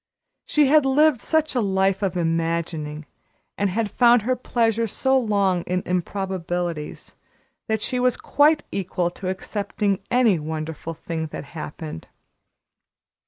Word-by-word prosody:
She 300 -1 +4
had 300 +2 +5
lived 275 -1 +3
such 315 -1 +1
a 250 - +1
life 195 -1 +1
of 190 -2 -1
imagining, 165 -2 -2 0.5
and 200 -1 0
had 210 +2 -1
found 240 -2 +5
her 255 +3 +1
pleasure 230 -2 0
so 265 +5 +1
long 200 -7 +2
in 180 0 -1
improbabilities, 180 -3 -3 0.5
that 220 -1 0
she 250 - 0
was 250 0 +2
quite 300 +1 +3
equal 180 -2 -1
to 185 +1 -5
accepting 200 +1 -2
any 235 -8 +3
wonderful 160 +1 -5
thing 160 0 -4
that 150 - -7
happened. 155 - -7
195 Hz, 130 wpm, -23 LUFS, 170-240 Hz, 0.5 s, had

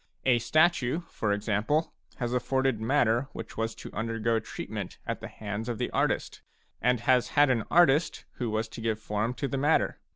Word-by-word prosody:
A 125 -2 +4
statue, 155 +3 +2
for 110 - -1
example, 110 +9 0 0.2
has 120 -1 -3
afforded 130 -1 0
matter 120 0 +2
which - - -8
was 115 0 -2
to - - -10
undergo 115 +1 0
treatment 110 - -6
at - - -3
the - - -7
hands 105 +2 -5
of 120 - -2
the - - -2
artist, - - -1 0.4
and 125 -1 +2
has 125 0 +3
had 145 -2 +6
an 115 -4 0
artist 165 -2 +3
who 120 -3 -2
was 110 +1 -1
to 115 - -8
give 110 -1 -1
form 110 +3 -2
to 140 - -2
the 135 +1 -2
matter. 150 +3 +2
120 Hz, 185 wpm, -28 LUFS, 110-135 Hz, 0.4 s, had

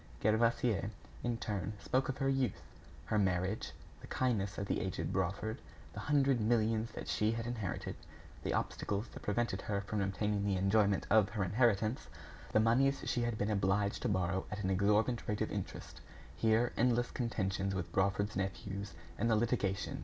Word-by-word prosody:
Gervaise, 110 -1 +2 0.3
in 120 -1 -1
turn, 105 -3 -3
spoke 130 +6 0
of 130 - -2
her 135 - 0
youth, 135 -5 0 0.4
her 105 - +1
marriage, 95 +1 0 0.3
the - - -11
kindness 105 -6 0
of 100 - -2
the - - -1
aged - - -2
Brawford, 100 +6 -1 0.3
the - - -6
hundred 140 -4 +2
millions 110 0 +2
that - - -6
she 105 +1 +1
had 115 0 -3
inherited, 110 -6 -3 0.5
the - - -2
obstacles 105 +2 -1
that - - -9
prevented 105 -2 -1
her 100 -1 -1
from 100 +1 -2
obtaining 100 +1 0
the 100 -1 +1
enjoyment 100 +1 +3
of 105 -1 +5
her 105 -1 -1
inheritance, 110 +3 +2 0.4
the - - +4
moneys 130 +5 +3
she 120 - +1
had 120 -2 -1
been 105 +1 0
obliged 100 0 +1
to - - 0
borrow 95 -1 0
at 105 0 -4
an 95 - +1
exorbitant 105 +5 +2
rate 105 - -1
of - - 0
interest, - - -6 0.4
her 115 +2 +3
endless 120 0 +2
contentions 100 -5 -1
with 90 -3 -3
Brawford's 100 +2 +1
nephews, 95 0 -3 0.2
and 115 - +2
the 110 - +4
litigation! 105 -4 0
105 Hz, 170 wpm, -34 LUFS, 100-115 Hz, 0.5 s, of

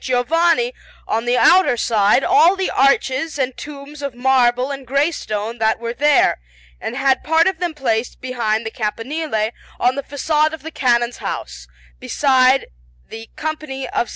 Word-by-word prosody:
Giovanni, 330 - +1 0.3
on 225 +2 -1
the 245 +1 +1
outer 365 -7 +5
side, 220 +2 +2
all 390 -2 +4
the 385 -1 -2
arches 275 +3 +1
and 265 -2 -2
tombs 290 0 -10
of 280 -3 -5
marble 250 0 +2
and 270 -2 -7
grey 280 +5 +1
stone 220 -4 -5
that 220 0 +1
were 235 0 -4
there, 290 - +3 0.4
and 245 - -5
had 270 -1 +1
part 320 +1 +3
of 380 -3 0
them 350 -3 -3
placed 235 -4 -2
behind 235 -3 -2
the 220 - -4
campanile 225 +1 -3 0.3
on 250 - +2
the 280 - -4
façade 305 +3 0
of 320 -3 -8
the 320 - -7
Canon's 240 -4 +1
house, - - -6 0.3
beside 260 - +2 0.4
the 225 0 -9
Company 305 -3 -5
of 240 - -1
S. - - -13
265 Hz, 165 wpm, -19 LUFS, 235-300 Hz, 0.4 s, outer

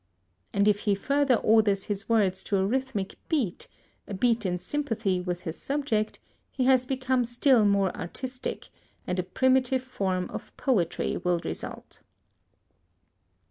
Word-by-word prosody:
And 200 +1 +2
if 205 -1 +4
he 205 -1 +1
further 280 +5 +2
orders 215 -3 +3
his 205 +1 -4
words 195 -5 +2
to 200 - +1
a 190 - +2
rhythmic 240 -3 -2
beat, 260 - -1 0.4
a 200 - -5
beat 230 0 +1
in 180 0 -1
sympathy 215 -3 -1
with 180 -1 -3
his 160 -2 -6
subject, 270 -7 -1 0.3
he 260 - -2
has 255 -1 +4
become 260 -1 +1
still 240 -1 +3
more 200 -2 +2
artistic, 255 +9 -5 0.4
and 180 - -2
a - - +1
primitive 260 +5 +2
form 190 -8 -2
of - - -8
poetry 205 - 0
will 180 -1 +1
result. - - -7
215 Hz, 140 wpm, -27 LUFS, 190-260 Hz, 0.4 s, if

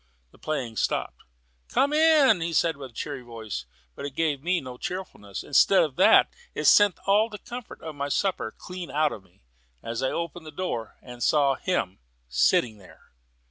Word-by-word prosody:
The - - -21
playing 130 -8 -3
stopped. - - -1 0.5
"Come 285 +2 +2
in," 275 - +4
said 165 0 +2
a 135 -2 -9
cheery 140 +3 -5
voice; 110 - -7 0.3
but - - -9
it 140 -1 -6
gave 150 -4 0
me 175 +3 +1
no 130 -3 -9
cheerfulness. 140 - -6
Instead 190 +7 +4
of 150 -5 -3
that, 185 - +6 0.2
it - - -3
sent 205 -3 +6
all 210 +3 +3
the 210 - -8
comfort 245 +2 -9
of 160 - -6
my 140 0 -4
supper 180 - -1
clean 180 -3 -8
out 150 +2 +1
of 105 - -7
me, 85 -9 -29 0.4
as 115 +2 -4
I 130 - +1
opened 170 -1 -5
the - - -8
door 145 -9 -4
and 125 -1 -11
saw 140 -1 +3
him 130 - -2 0.3
sitting 105 - +2
there. 95 - -19
150 Hz, 180 wpm, -26 LUFS, 120-185 Hz, 0.5 s, that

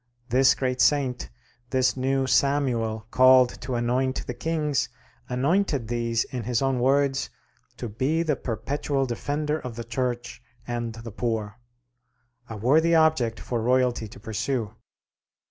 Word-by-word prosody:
This 130 +2 +5
great 130 -1 -1
saint, 135 -4 +2 0.4
this 130 -1 +2
new 135 +1 0
Samuel 125 -4 +1
called 130 -1 +5
to 125 +1 -3
anoint 125 +2 0
the 125 - -4
kings, 145 -1 -1 0.4
anointed 140 - 0
these, 115 -1 0
in 125 - -6
his 115 +1 0
own 135 -2 0
words, 135 +1 +2 0.5
"to 120 - -5
be 135 +10 0
the 155 -3 +1
perpetual 135 +4 -2
defender 150 +5 -2
of 125 -5 -7
the 115 - -5
Church 120 0 -3 0.2
and 120 -2 -4
the 115 0 -8
poor": 110 -1 -3 0.9
a 110 - -6
worthy 155 +10 +3
object 155 -8 +3
for 120 -2 -3
royalty 125 -1 +1
to - - -13
pursue. 110 +2 -3
125 Hz, 135 wpm, -25 LUFS, 120-135 Hz, 0.9 s, This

